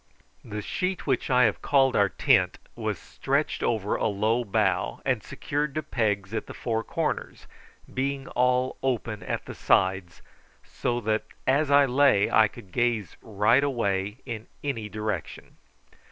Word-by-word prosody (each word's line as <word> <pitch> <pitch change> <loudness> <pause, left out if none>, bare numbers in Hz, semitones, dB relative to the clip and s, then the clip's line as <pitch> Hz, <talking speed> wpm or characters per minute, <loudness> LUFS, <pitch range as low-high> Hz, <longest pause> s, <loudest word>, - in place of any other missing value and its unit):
The 105 -1 -6
sheet 185 - -2
which 130 -4 0
I 125 -1 +5
have 110 -3 +1
called 135 -2 +3
our 100 -1 +4
tent - - +2 0.2
was - - -2
stretched - - -2
over 105 -3 0
a - - 0
low 110 +4 +1
bough, 100 -4 0
and - - +1
secured 145 0 -3
to 155 - -1
pegs 105 -7 -1
at 110 - -3
the - - -9
four 115 -2 -2
corners, - - -3 0.5
being 135 +1 -2
all 125 +1 +1
open 115 -5 -2
at 90 - -4
the - - -7
sides, 95 -2 +1 0.4
so 120 -1 -2
that 110 0 0 0.2
as 140 +3 +2
I 140 0 +6
lay 130 -5 +3
I 110 -1 +6
could 100 -2 -14
gaze 115 -4 0
right 110 +5 +3
away 105 -6 -1
in 115 -3 -6 0.2
any 115 -7 -3
direction. 105 +1 -5
115 Hz, 155 wpm, -26 LUFS, 105-130 Hz, 0.5 s, I